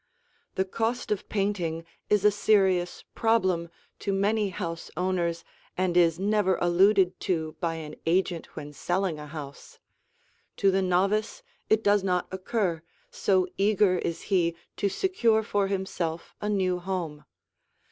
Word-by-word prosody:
The 190 - +1
cost 225 +5 -2
of 210 - -2
painting 180 -5 -1 0.2
is 210 -1 +3
a 210 - +7
serious 190 -4 +2
problem 185 -7 +1 0.3
to 200 - -2
many 205 +2 +1
house 170 -3 -5
owners 175 -2 0 0.3
and 180 -1 0
is 170 -2 +4
never 200 -1 +2
alluded 185 +2 +3
to 160 -3 -2
by 165 -2 -1
an 155 -2 -7
agent 175 -1 0
when 145 0 -7
selling 175 +2 -1
a 150 - -8
house; 145 -2 -9 0.8
to 195 - +4
the 190 +1 +2
novice 200 - +1 0.3
it 220 0 +3
does 205 -1 +3
not 180 -2 0
occur, 190 -3 -1 0.3
so 185 -2 +2
eager 200 -2 +3
is 165 - -3
he 170 -3 +2 0.2
to 200 - +1
secure 230 - +2
for 205 -2 0
himself 185 -4 -3
a 210 - -1
new 185 -3 +1
home. 175 -5 -4
185 Hz, 140 wpm, -27 LUFS, 170-205 Hz, 0.8 s, a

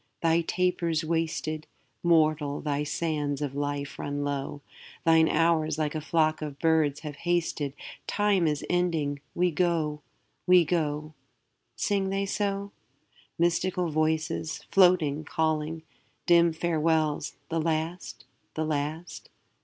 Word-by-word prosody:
'Thy 165 0 +4
taper's 170 -2 0
wasted; 155 -1 -2 0.3
Mortal, 155 -4 +2
thy 145 -1 -1
sands 150 -3 -2
of 145 -2 -3
life 145 0 -3
run 145 0 -3
low; 145 0 -3 0.4
Thine 160 -1 +5
hours 160 -1 +2
like 150 -2 -1
a 155 - -3
flock 155 0 +1
of 150 -2 -5
birds 155 -3 +2
have 150 -2 -7
hasted: 165 -5 -1 0.3
Time 205 -5 +2
is 150 -2 -1
ending; 160 -5 0
we 180 0 +2
go, 155 -3 0 0.5
we 180 -2 +6
go.' 155 -2 -1 0.6
Sing 195 -2 0
they 195 +1 0
so? 200 0 -2 0.7
Mystical 175 +1 +1
voices, 155 +1 -1
floating, 175 -6 +4
calling; 160 0 -1 0.4
Dim 170 -1 +5
farewells 160 -2 0
the 165 0 0
last, 165 +2 -3 0.3
the 155 - -1
last? 155 +3 -4
160 Hz, 120 wpm, -27 LUFS, 150-170 Hz, 0.7 s, we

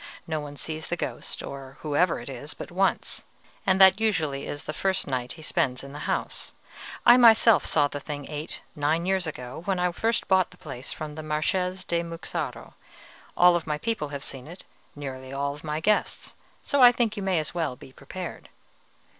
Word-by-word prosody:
No 160 -1 -2
one 145 -1 -7
sees 155 +1 -5
the 175 - -1
ghost, - - -4
or 135 -1 -8
whatever 160 +4 +2
it 120 - -10
is, 140 +2 -7
but - - -8
once, 195 +2 0 0.4
and 190 0 +4
that 190 +2 +7
usually 155 -11 0
the 145 +1 -5
first 190 +4 0
night 125 -2 -2
he 160 - -12
spends 125 -4 0
in 140 0 -9
the 145 - -7
house. - - -2 0.5
I 240 +1 +9
myself 230 -2 +6
saw 145 -2 +4
the 145 - -5
thing 145 0 -6
eight 150 0 -6
nine 155 +3 +1
years 190 -2 +1
ago, 125 -2 -6
when 195 -2 +1
I 180 0 +1
first 225 +6 0
bought 190 -1 +4
the 180 - -17
place 135 -7 -7
from 155 -1 -5
the 155 - -6
Marchese 180 +5 -1
di 170 -1 +1
Muxaro; 165 -1 -5 0.6
all 175 -1 +6
my 150 -1 0
people 150 -1 -2
have 140 -1 -6
seen 130 -1 -6
it, 175 +3 -10 0.3
nearly 130 -2 -7
all 140 +1 -2
my 150 -1 -2
guests, 210 +6 0 0.3
so 285 - +2
I 245 -1 +10
think 235 -3 0
you 205 - -4
may 190 -2 +1
as 155 -2 -2
well 165 -7 -1
be 130 +1 -14
prepared." 175 +7 -8
155 Hz, 190 wpm, -26 LUFS, 145-185 Hz, 0.6 s, I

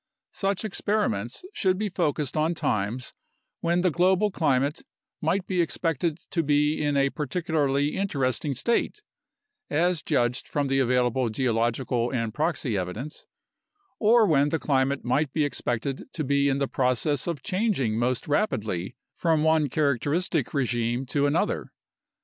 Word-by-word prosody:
Such 195 +1 -1
experiments 200 - -1
should 185 -2 +1
be 210 +1 -1
focused 150 -6 -1
on 160 +2 +1
times 110 -1 -2 0.5
when 170 +1 +1
the 180 -1 +2
global 185 +5 +3
climate 140 -3 +1 0.4
might 180 +4 0
be 185 -2 +1
expected 165 0 -1
to 170 - +1
be 150 0 +2
in 145 -1 +1
a 140 0 +2
particularly 150 -2 0
interesting 140 - -1
state 235 - 0 0.7
(as 170 +2 +1
judged 125 -4 0
from 145 -2 -1
the 135 0 +2
available 125 -1 +2
geological 120 +1 0
and 115 -4 -2
proxy 150 -6 -1
evidence) 100 +10 -5 0.7
or 225 +1 +5
when 145 -5 +3
the 160 - 0
climate 135 -2 0
might 135 +3 +1
be 155 -2 +2
expected 130 -1 -3
to 155 - -2
be 140 0 +2
in 135 - +1
the 140 -1 0
process 130 +4 0
of 155 -6 -3
changing 185 - 0
most 125 +1 0
rapidly 110 - -1 0.2
from 160 -3 +2
one 160 -2 +3
characteristic 150 +4 0
regime 120 -2 0
to 140 +2 +1
another. 165 +8 0
145 Hz, 140 wpm, -26 LUFS, 125-170 Hz, 0.7 s, or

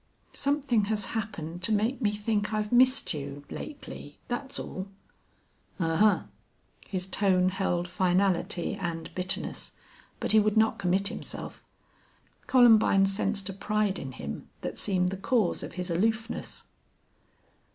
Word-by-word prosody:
"Something 275 -6 +1
has 210 -1 0
happened 175 -6 -4
to 185 - +1
make 220 +6 +1
me 210 -3 +2
think 210 0 -1
I've 210 0 -2
missed 255 +2 +4
you 140 -1 -6
lately 280 - -8
that's 270 +3 -3
all." 185 +1 -5 0.9
"Ahuh!" 180 +5 +3 0.6
His 185 -2 -2
tone 185 -1 +3
held 180 -2 -1
finality 180 -1 +1
and 170 -3 -5
bitterness, 185 +1 -1 0.5
but - - +1
he 215 - +7
would 215 +1 +2
not 220 -1 +3
commit 195 +2 +1
himself. - - -7 0.8
Columbine 225 -6 +6
sensed 195 0 -1
a - - -4
pride 210 0 0
in 135 -1 -6
him 70 - -7
that - - -4
seemed 180 -3 +1
the 190 - -4
cause 210 -1 +1
of - - -7
his 180 0 -4
aloofness. 220 +6 -1
200 Hz, 130 wpm, -28 LUFS, 180-220 Hz, 0.9 s, he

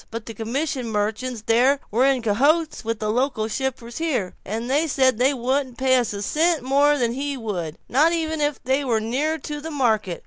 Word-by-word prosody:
But 230 0 -6
the 225 - -7
commission 250 +4 -3
merchants 220 +2 -2
there 255 +5 +3
were 245 +5 +3
in 265 -3 +1
cahoots 285 +10 +2
with 230 0 -2
the 215 0 -2
local 245 -2 0
shipper 250 0 -3
here; 250 - -2
they 250 - -1
said 260 -4 +2
they 260 +3 +4
wouldn't 260 -1 -1
pay 260 0 +3
us 245 -3 0
a 200 0 -4
cent 320 - +1
more 285 +3 +3
than 235 -3 0
he 280 +2 -3
would, 180 -9 -4
not 300 +6 +3
even 320 -2 -1
if 290 -2 0
they 265 +3 +1
was 230 -5 0
nearer 285 +8 0
to 295 -1 -6
the 320 - -6
market. 220 - 0
255 Hz, 200 wpm, -23 LUFS, 225-285 Hz, -, they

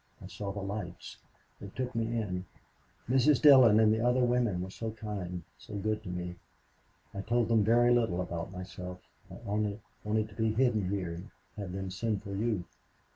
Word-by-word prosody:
I - - -10
saw 100 -1 -5
the 100 0 -5
lights. 100 -3 -6 0.4
They 100 - -8
took 125 +5 -4
me 115 -1 0
in. 90 -4 -3 0.6
Mrs. 130 +2 +4
Dillon 130 -7 +8
and 110 -1 +5
the 110 +1 0
other 125 +1 +3
women 120 -7 +1
were 95 - -7
so 115 +3 -4
kind, 100 -6 -5 0.2
so 105 - -9
good 105 +2 -1
to 105 - -8
me. 90 0 -4 0.8
I 100 - -4
told 120 +2 +1
them 115 -2 +4
very 120 +3 +5
little 110 -7 +2
about 85 -1 -4
myself. 90 -1 -7 0.3
I 95 - -9
only 105 0 -1 0.2
wanted 110 0 0
to 100 - -15
be 110 0 +1
hidden 110 -6 +2
here 95 -4 -2
and 90 +6 -8 0.3
have 100 -3 -5
them 95 -1 -4
send 105 +1 -2
for 100 - -6
you. 105 -2 0
105 Hz, 185 wpm, -31 LUFS, 95-115 Hz, 0.8 s, Dillon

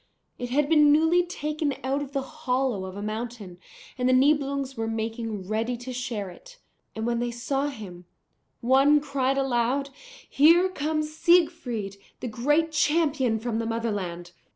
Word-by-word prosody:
It 245 - -4
had 280 +3 +2
been 300 -2 +5
newly 320 +4 +4
taken 305 -4 -3
out 270 +2 0
of 285 -1 -6
the 275 -1 -2
hollow 260 -8 -2
of 190 +1 -8
a 205 - -5
mountain, 215 -4 -6 0.4
and 250 0 +2
the - - +4
Nibelungs 275 0 +2
were 225 -1 -3
making 225 -3 -4
ready 225 +3 -1
to 250 +2 -7
share 225 -6 -4
it. - - -15 0.4
And 220 0 -3
when 235 0 0
they 240 0 -1
saw 270 +4 -2
him, 195 -10 -8 0.6
one 270 +4 +5
cried 275 -2 -1
aloud, 270 +1 0 0.4
'Here 335 +6 +5
comes 310 -2 -2
Siegfried, 295 - +1 0.2
the - - -4
great 295 +8 +1
champion 300 -6 +2
from 225 0 -3
the 230 - -2
Motherland!' 200 -7 -3
260 Hz, 155 wpm, -26 LUFS, 225-295 Hz, 0.6 s, been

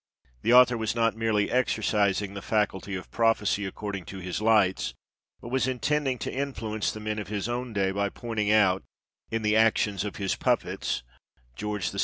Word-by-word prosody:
The - - +1
author 125 -1 +7
was 110 0 -1
not 115 -1 +2
merely 110 -2 +1
exercising 105 -5 +1
the 100 - -6
faculty 100 -2 -1
of 90 - -7
prophecy 105 -3 +1
according 100 -1 -5
to 95 - -8
his 90 +1 -4
lights, 105 -4 +2 0.5
but 120 - -8
was 130 +1 +1
intending 135 +1 0
to - - -4
influence 115 -6 -2
the 110 - -7
men 110 0 -3
of 105 - -5
his 105 0 -3
own 120 0 -3
day 100 -3 +1
by 100 +1 0
pointing 110 -1 -3
out, 95 -3 +4 0.5
in 115 -1 -2
the 105 0 +2
actions 110 -2 +3
of 105 - -5
his 100 -2 -1
puppets - - -1 0.5
George 105 +1 -2
VI. 100 - -5
105 Hz, 180 wpm, -27 LUFS, 100-115 Hz, 0.5 s, author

